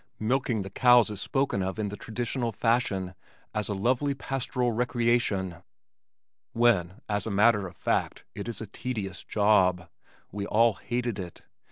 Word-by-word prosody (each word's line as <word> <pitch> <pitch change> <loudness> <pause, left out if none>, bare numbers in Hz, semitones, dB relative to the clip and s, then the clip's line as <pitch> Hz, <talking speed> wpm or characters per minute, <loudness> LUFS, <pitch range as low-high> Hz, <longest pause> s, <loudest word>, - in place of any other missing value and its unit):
Milking 115 -1 0
the 95 - -8
cows 120 -1 +5
is 100 -2 -5
spoken 135 -7 0
of 95 +2 -3
in 105 -2 -2
the 105 - -6
traditional 120 +2 -3
fashion 100 -5 0 0.4
as 105 0 -2
a 100 - -1
lovely 130 +7 +1
pastoral 125 -2 -1
recreation, 120 -6 0 1.0
when 115 -4 +2
as 105 +1 -2
a - - -1
matter 105 -1 +3
of 90 - -13
fact - - -1
it 100 - -6
is 115 -3 -4
a - - -4
tedious 105 -3 -5
job. 95 -4 +2 0.4
We 100 0 -4
all 115 +1 +4
hated 120 +1 -3
it. 90 -2 -8
110 Hz, 155 wpm, -28 LUFS, 100-120 Hz, 1.0 s, cows